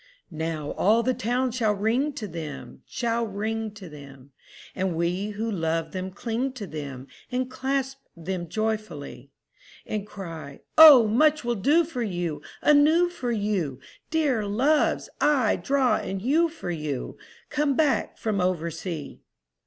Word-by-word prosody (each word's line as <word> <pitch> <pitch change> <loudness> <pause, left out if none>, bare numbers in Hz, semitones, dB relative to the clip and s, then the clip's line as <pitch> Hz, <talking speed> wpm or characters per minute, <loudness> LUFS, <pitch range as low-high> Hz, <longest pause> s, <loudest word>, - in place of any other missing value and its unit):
II 160 - -10
Now 160 -2 -3
all 220 +4 +3
the 255 - +1
town 250 +1 0
shall 220 -3 +1
ring 235 +9 +1
to 215 -5 -5
them, 160 -5 -8
Shall 235 -2 -1
ring 220 +2 -3
to 195 -4 -10
them, 140 -3 -13 0.4
And 185 -2 -1
we 175 +4 -1
who 220 +2 -3
love 165 -3 -1
them 185 0 -4
cling 235 +6 -3
to 235 -6 -6
them 140 -6 -7 0.3
And 255 +1 -2
clasp 270 +1 -2 0.2
them 175 0 -4
joyfully; 215 - -4 0.6
And 210 -1 -4
cry, 165 -9 -8
"O 295 -8 +10
much 300 +7 +3
we'll 240 0 0
do 290 - +3
for 280 -6 -5
you 175 -8 -3 0.2
Anew 305 +4 +5
for 255 -8 -4
you, 200 - -1 0.3
Dear 295 -8 +1
Loves!—aye, 270 +1 +2
draw 270 -2 +2
and 190 0 -4
hew 320 +7 +3
for 310 - -6
you, 150 -5 -4 0.3
Come 295 -2 +1
back 280 -7 +1
from 210 -4 -1
oversea." 170 -3 -3
215 Hz, 145 wpm, -26 LUFS, 170-255 Hz, 0.6 s, O